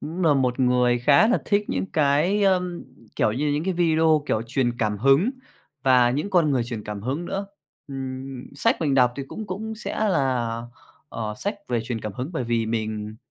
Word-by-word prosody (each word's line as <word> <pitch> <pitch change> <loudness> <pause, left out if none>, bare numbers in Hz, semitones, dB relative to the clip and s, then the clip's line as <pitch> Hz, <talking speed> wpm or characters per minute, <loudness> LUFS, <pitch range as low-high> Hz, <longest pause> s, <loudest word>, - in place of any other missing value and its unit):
cũng 170 +4 -5
là 155 -3 +5
một 130 -1 0
người 125 -1 +3
khá 140 - +5
là 245 - +3
thích 205 0 +1
những - - -1
cái, 155 +7 +2
ơm, 180 -3 +1 0.3
kiểu 105 - +2
như, 145 +6 -1
những 150 +2 -1
cái 190 -1 -1
video, 160 -2 +3
kiểu, 110 - 0
truyền 120 -1 -1
cảm 105 -2 0
hứng 135 - +4 0.5
và 125 -2 +5
những 150 +10 -2
con 170 -5 +3
người 130 -4 +1
truyền 115 -3 -6
cảm 105 -1 -6
hứng 135 +9 -2
nữa. 195 +3 -3 0.4
Ừm, 130 -1 -6
sách 230 +2 +2
mình 145 -4 +1
đọc 125 -2 +4
thì 140 - -3
cũng 220 - -7
cũng 220 +4 -5
sẽ 215 - -5
là, 125 - 0 0.5
ờ, 110 -5 -4
sách 205 - -2
về 120 -2 0
truyền 115 -1 -4
cảm 105 - -5
hứng, 125 +9 -5
bởi 145 -7 -2
vì 115 -1 0
mình, 110 -1 -3
135 Hz, 205 wpm, -24 LUFS, 120-170 Hz, 0.5 s, là